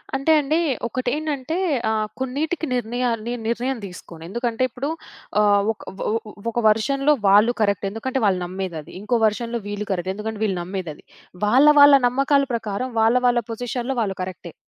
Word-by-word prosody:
అంటే 275 +4 +1
అండి 300 +2 0 0.3
ఒకటెంటంటే 285 +4 -2 0.3
ఆ! - - +1 0.3
కొన్నిటికి 295 +6 -2
నిర్ణయా 245 +1 -1 0.2
నే 240 - -2
నిర్ణయం 245 +3 -1
తీసుకోను. 170 -3 -11
ఎందుకంటే 235 +3 -1
ఇప్పుడు 255 +4 -4 0.5
ఆహ్, 205 -1 +4
ఒక 220 - -10 0.3
ఓహ్ 220 - +1
ఒక 205 - -17
ఒక 240 - -1
వెర్షన్‌లో 275 +7 +2
వాళ్ళు 205 +4 +6
కరెక్ట్ 200 -1 +1
ఎందుకంటే 255 +6 -3
వాళ్ళు 190 -3 +2
నమ్మేదది 180 -4 -6
ఇంకో 235 +4 +1
వెర్షన్‌లో 230 +2 -1
వీళ్ళు 205 0 -4
కరెక్ట్ 185 0 -1
ఎందుకంటే 215 +1 -5
వీళ్ళు 195 -3 -1
నమ్మేదది 180 -4 -6 0.4
వాళ్ళ 255 +7 +5
వాళ్ళ 285 0 +9
నమ్మకాల 275 +3 +2
ప్రకారం 225 +2 -3
వాళ్ళ 225 +2 +4
వాళ్ళ 240 -1 +3
పొజిషన్‌లో 245 +3 -3
వాళ్ళు 195 -3 -2
కరెక్టె. 180 -2 -8
230 Hz, 155 wpm, -22 LUFS, 200-260 Hz, 0.5 s, వాళ్ళ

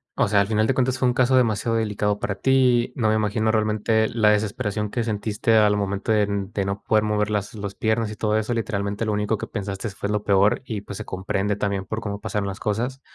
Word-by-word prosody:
o - - +2
sea, 100 0 +3
al 100 - 0
final 110 0 +1
de 135 - +2
cuentas 130 0 0
fue 130 - +2
un 125 - +2
caso 130 +1 +3
demasiado 115 -1 +1
delicado 105 -2 -1
para 100 - -2
ti, 125 0 +3
no 110 -4 +1
me 110 - +3
imagino 110 +1 +1
realmente 110 0 +1
la 110 -2 +3
desesperación 105 0 -1
que 120 +2 -2
sentiste 110 0 -1
al 105 -1 +4
momento 100 +1 -2
de 105 -1 +4
n 100 -1 -2
de 100 - -1
no 100 +1 -4
poder 110 -1 +2
mover 105 -1 0
las 105 -1 -2
los 100 -2 -6
piernas 110 0 0
y - - -6
todo 105 0 0
eso, 110 +2 -1
literalmente, 105 -2 -2
lo 110 - 0
único 105 +1 0
que - - -6
pensastes 100 0 -5
fue 100 - -4
lo 105 0 -1
peor 100 +2 +3
y, 110 -5 -4
pues, 100 -1 -8
se - - -6
comprende 95 +2 -2
también 100 -1 -2
por 110 +2 -4
cómo 100 -1 -4
pasaron 105 -1 -2
las 100 +1 -5
cosas. 120 +6 -2
105 Hz, 240 wpm, -23 LUFS, 100-110 Hz, -, al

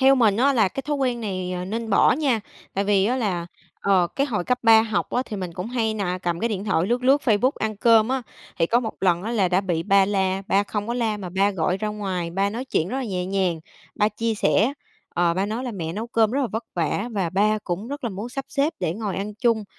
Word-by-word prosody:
Theo 270 +1 +6
mình 220 -6 +3
á 275 +4 +4
là 220 -7 +3
cái 270 - -5
thói 295 -1 -2
quen 250 -3 0
này, 185 -4 -3
ờ, 180 0 -3
nên 220 +3 -4
bỏ - - +5
nha, 265 -6 +1 0.3
tại 195 - 0
vì 200 -1 +3
á 250 - +1
là, 185 -8 -1 0.3
ờ, 190 -3 +3
cái 275 +1 +2
hồi 210 -9 -2
cấp 250 0 +1
3 225 -1 +7
học 220 -2 -2
á 250 - +1
thì 210 - -5
mình 185 -3 -5
cũng 180 +3 -5
hay 225 -2 -1
nà 185 -3 -2
cầm 175 -1 -2
cái 230 - +1
điện 205 -2 -3
thoại 185 -4 +1
lướt 245 +2 0
lướt 275 +3 +5
Facebook 240 +2 +3
ăn 215 -1 -2
cơm 225 +1 +5
á, 265 -1 -1 0.4
thì 165 - +3
có 235 +7 +3
một 225 -3 -4
lần 175 -2 +2
á 225 - -3
là 195 -5 +2
đã 180 +1 +2
bị 175 -4 -1
ba 195 0 +4
la, 190 -1 0
ba 195 +1 +3
không 205 +1 -4
có 235 - -2
la 225 -3 0
mà 190 -3 -6
ba 195 +3 +2
gọi 180 0 0
ra 215 +1 -3
ngoài, 190 -5 -3
ba 195 +3 0
nói 240 +4 -4
chuyện 175 -9 0
rất 255 - -3
là 265 - -2
nhẹ 180 -4 -3
nhàng, 185 -4 0 0.3
ba 210 0 +2
chia 225 +1 -2
sẻ, 220 +4 +2 0.4
ờ, 170 -1 +2
ba 190 +3 0
nói 230 +5 -3
là 250 - -3
"Mẹ 165 -4 -4
nấu 215 +5 -4
cơm 225 -3 +2
rất 275 +4 0
là 260 - +1
vất 225 +1 -4
vả 175 +6 -1
và 190 -5 -1
ba 210 +3 +2
cũng 190 +6 -3
rất 285 -1 -6
là 235 - -1
muốn 205 +5 -5
sắp 270 +2 -5
xếp 300 +3 0
để 160 - 0
ngồi 205 -3 -3
ăn 205 +2 -4
chung 225 -1 +1
210 Hz, 275 wpm, -23 LUFS, 190-235 Hz, 0.4 s, 3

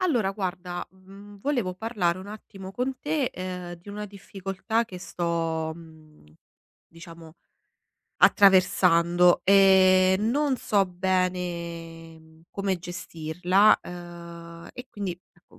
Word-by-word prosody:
Allora 250 - +1
guarda, 180 -3 -5
mhmm, 195 +2 -15
volevo 240 -9 -1
parlare 185 -4 -1
un 190 +2 -10
attimo 200 -2 -10
con 255 +5 -3
te, 295 -1 -1
ehm, 180 -1 -6
di 175 +3 -17
una 210 +1 -6
difficoltà 200 +2 -3
che 185 -5 -10
sto, 165 -3 -2
mhmm, 160 -2 -17 0.6
diciamo 165 -1 -13 0.8
attraversando, 180 -3 +4
e 190 -1 +5
non 265 +6 +1
so 205 -4 +1
bene, 175 -3 -3
mhmm, 160 0 -21
come 195 -2 -2
gestirla, 175 +3 +1
ehm, 170 -1 -10
e 250 - -10
quindi 200 -3 -4 0.2
ecco 175 - -24
185 Hz, 110 wpm, -26 LUFS, 170-200 Hz, 0.8 s, e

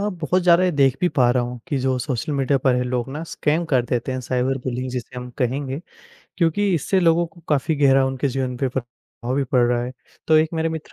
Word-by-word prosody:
अ, 205 - 0
बहुत 180 -1 -1
ज़्यादा 175 +1 +5
ये 185 - +3
देख 135 -3 +3
भी 180 - +3
पा 125 -7 +3
रहा 125 0 +2
हूँ 125 0 -5
कि 140 - 0
जो 130 0 0
सोशल 135 +4 -3
मीडिया 140 0 +1
पर 130 -1 +2
है 125 - +1
लोग 125 -1 -2
ना, 155 +2 -5
स्कैम 160 +1 -1
कर 135 -6 +2
देते 125 +2 -2
हैं, 130 - -3
साइबर 130 +1 -1
बुलींग 125 0 -3
जिसे 125 0 -6
हम 125 0 -7
कहेंगे, 135 +3 -2 0.6
क्योंकि 185 +3 +1
इससे 185 +5 +1
लोगों 170 0 +3
को 170 +1 -19
काफ़ी 150 +1 +1
गहरा 135 -2 +4
उनके 135 +1 -1
जीवन 130 -1 -2
पे 135 +1 0
प्रभाव 120 0 -6
भी 140 - +1
पड़ 125 -1 +2
रहा 120 0 +1
है। 125 - -6 0.3
तो 155 - +5
एक 155 0 +2
मेरे 160 0 0
मित्र 160 -1 -7
135 Hz, 240 wpm, -22 LUFS, 125-160 Hz, 0.6 s, ज़्यादा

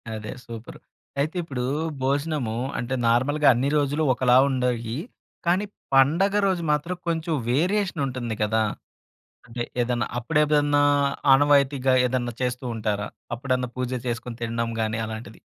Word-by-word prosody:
అదే 110 0 -6
సూపరు! 115 -1 -9 0.4
అయితే 155 +5 -1
ఇప్పుడు 130 -6 -4 0.4
భోజనము 140 -4 -1 0.2
అంటే 125 +2 -2
నార్మల్‌గా 145 +6 +2
అన్ని 130 +4 0
రోజులు 145 +2 +1
ఒకలా 125 +1 +4
ఉండేయి, 125 -2 -1 0.5
కానీ 185 +4 +2 0.3
పండగ 160 +9 +4
రోజు 180 -3 0
మాత్రం 150 +5 0
కొంచెం 165 0 -1 0.2
వేరియేషన్ 185 +2 +1
ఉంటుంది 120 -3 -4
గదా! 110 +1 +2 0.8
అంటే 120 0 -4 0.2
ఏదన్నా 120 -2 0
అప్పుడేదన్నా 145 +1 +2 0.5
ఆనవాయితీగా 140 -2 +4
ఏదన్నా 120 -1 -1
చేస్తూ 125 0 -2
ఉంటారా? 105 -2 -2 0.3
అప్పుడన్నా 125 0 -1
పూజ 125 -1 -2 0.2
చేసుకొని 120 0 -4
తినడం 115 0 -2
గాని 110 0 -1
అలాంటిది. 110 -1 -8
130 Hz, 125 wpm, -24 LUFS, 120-145 Hz, 0.8 s, ఒకలా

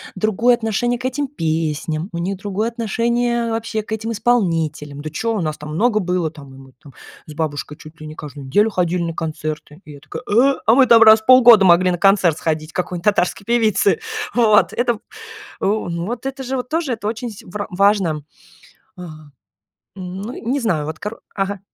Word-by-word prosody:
другое 220 +5 +2
отношение 240 +2 -1
к 255 - -7
этим 275 +2 -2
песням, 160 - -2
у 170 - -6
них 185 +3 -3
другое 205 +2 -2
отношение 235 +1 -1
вообще 225 -1 -2
к 215 - -14
этим 225 +1 -3
исполнителям. 165 -11 -1
Да 155 - -5
чё, 225 +9 -2
у - - -2
нас 155 -2 -3
там 150 0 -8
много 215 +3 +2
было, 180 -3 -1
там 145 -3 -13
мы 135 0 -15
там 140 - -15 0.3
с 155 - -10
бабушкой 150 -1 -4
чуть 155 +1 -14
ли 155 - -8
не 155 - -9
каждую 145 -3 -9
неделю 205 +11 +3
ходили 180 -2 0
на 165 -1 -3
концерты. 155 -1 -5
И 150 - -11
я 145 - -12
такая: - - -8
"Э. 255 +6 +4
А 225 - +5
мы 265 -1 +5
там 230 -1 +7
раз 220 0 +7
в - - -25
полгода 240 -4 +8
могли 180 0 +5
на 175 - -1
концерт 195 -4 +3
сходить 155 -1 -3
к - - -42
какой-нибудь 180 -1 -3
татарской 200 -1 +1
певице". 220 -3 +2 0.3
Вот 220 -3 +4
это 240 -1 0
в - - -11
э, - - -23 0.6
ну 175 -5 -1
вот 240 +4 -5
это 270 0 -4
же 265 +1 -3
вот 250 -1 -4
тоже 315 -3 -1
это 220 -3 -3
очень 235 +2 -4
с 210 - -12
вр 205 +3 -6
важно. 190 -5 +2 0.7
Ага, 155 -4 -11 0.7
м, 185 -1 -7
ну 225 +5 -6
не 260 +4 -2
знаю 170 - -1
вот 155 0 -6
кор 210 +2 -7
ага. 195 0 -2
195 Hz, 205 wpm, -19 LUFS, 160-230 Hz, 0.7 s, полгода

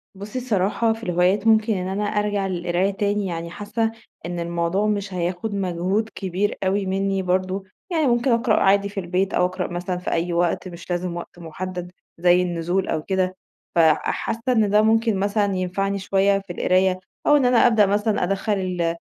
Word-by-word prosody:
بُصي، 205 +6 -5
الصراحة، 225 -1 +1
في 225 +1 -11
الهوايات 180 +4 +1
ممكن 220 0 +4
إن 185 -1 -2
أنا 200 +2 -2
أرجع 205 -1 0
للقراية 180 +1 0
تاني، 205 +1 -1
يعني 170 -2 -4
حاسَّة 220 +4 -2 0.3
إن 175 0 -4
الموضوع 170 +4 0
مش 200 -2 -2
هياخُد 180 +4 -2
مجهود 190 +3 -1
كبير 190 +1 -2
أوي 195 +1 +1
مِنِّي 195 0 0
برضه، 185 +1 -1 0.3
يعني 315 -4 +2
ممكن 240 +1 +2
أقرأ 230 -1 +3
عادي 200 +1 +3
في 200 - -5
البيت، 185 +2 -1
أو 180 - +3
أقرأ 185 0 -2
مثلًا 180 +1 -3
في 180 - -4
أي 170 +1 0
وقت، 175 +2 0
مش 175 0 -11
لازم 175 0 -2
وقت 175 0 -9
مُحدَّد 180 +2 -6 0.3
زي 175 +1 +4
النزول 175 +2 -1
أو 155 - -2
كده. 185 0 -1 0.4
فحاسَّة 175 +8 +1
إن 220 -4 +3
ده 210 +1 +5
ممكن 225 -2 +2
مثلًا 205 0 +1
ينفعني 195 +2 -1
شوية 195 0 +2
في 195 -3 -9
القراية، 185 +1 +2 0.3
أو 295 - +6
إن 265 - +2
أنا 245 0 +5
أبدأ 220 -3 +4
مثلًا 205 0 +1
أدخِّل 195 +3 0
ال 180 -4 -1
195 Hz, 180 wpm, -22 LUFS, 180-210 Hz, 0.4 s, أو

